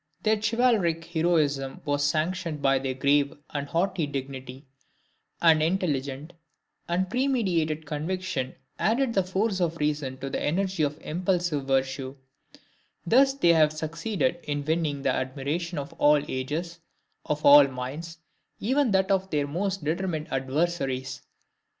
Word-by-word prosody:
Their 215 0 +3
chivalric 215 -8 +2
heroism 155 -5 0
was 145 0 0
sanctioned 160 +2 -1
by 135 -1 +3
their 130 -1 -3
grave 140 +2 +2 0.2
and 145 -1 -3
haughty 170 0 0
dignity; 135 -1 -6 0.8
an 160 -2 +6
intelligent 150 -4 -1 0.5
and 180 +2 0
premeditated 185 - 0
conviction 155 -2 -3 0.2
added 235 +3 +1
the 195 - +3
force 190 +1 -1
of 165 -1 0
reason 150 -3 -1
to 135 +1 -6
the - - -2
energy 185 +2 0
of 150 0 0
impulsive 175 -3 -1
virtue; 135 0 -1 0.9
thus 270 +7 +4
they 170 -11 +4
have 155 -2 +4
succeeded 165 - -2
in 145 -1 -3
winning 155 -3 -1
the 130 - +2
admiration 145 +7 -3
of 140 -1 -5
all 150 0 +5
ages, 155 +7 -4 0.5
of 150 0 -2
all 145 0 +9
minds, 140 +6 -6 0.4
even 265 +4 +2
that 190 -1 +2
of 190 0 +1
their 145 -4 0
most 185 +4 -2
determined 160 -1 -2
adversaries. 135 -1 -1
155 Hz, 130 wpm, -26 LUFS, 140-185 Hz, 0.9 s, all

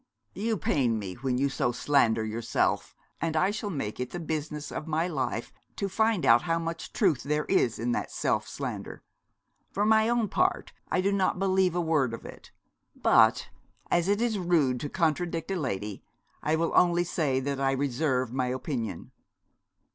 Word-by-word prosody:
'You 220 +3 -1
pain 125 -10 +1
me 100 -3 -5
when 125 +3 -2
you 140 +2 +2
so 135 -2 0
slander 115 -4 +2
yourself; 110 +1 -1 0.3
and 160 -1 0
I 185 +5 +3
shall 210 0 -4
make 135 - -4
it 125 0 -3
the 175 - -5
business 150 -2 -4
of 155 - -5
my 160 +2 0
life 170 - -3 0.2
to 200 - -2
find 220 0 +1
out 115 +1 +6
how 165 -1 0
much 165 0 -5
truth 175 - +2
there 150 +2 -1
is 120 - +2
in 120 +2 -1
that - - -2
self - - -1
slander. - - -6 0.7
For 205 - 0
my 220 +1 +4
own 240 -2 +2
part 365 - 0 0.2
I 185 - +1
do 195 +2 +1
not 195 -2 +1
believe 190 -2 +2
a 175 - +1
word 150 -8 +1
of - - -13
it; - - -11 0.5
but - - +4 0.4
as 175 +1 +2
it 205 +3 +2
is 225 -4 0
rude 160 -8 +2
to 145 - -4
contradict 165 +1 -1
a - - 0
lady 105 - -3 0.4
I 155 - +1
will 165 +1 0
only 175 -1 +4
say 150 -6 0
that 140 +1 -3
I 135 0 +2
reserve 130 -2 0
my 130 -1 0
opinion.' 125 - -4
155 Hz, 180 wpm, -28 LUFS, 130-180 Hz, 0.7 s, out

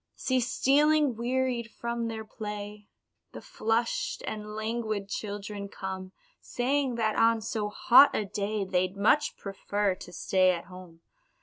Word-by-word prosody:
See 260 -1 0
stealing, 285 +2 +3
wearied 245 0 -1
from 235 +1 -3
their 220 -1 -5
play, 210 -1 -7 0.5
The - - -8
flushed 240 - -1
and 210 0 -6
languid 220 -2 -3
children 205 -1 -5
come, 190 -1 -6 0.3
Saying 260 +1 -1
that 220 -2 0
on 230 0 +4
so 220 -1 -3
hot 250 +6 +6
a 210 - 0
day 200 +1 -2
They'd 185 0 0
much 220 +9 +2
prefer 200 0 -1
to 180 - -11
stay 185 +2 +2
at 170 - -6
home. 180 -2 -13
215 Hz, 135 wpm, -28 LUFS, 200-235 Hz, 0.5 s, hot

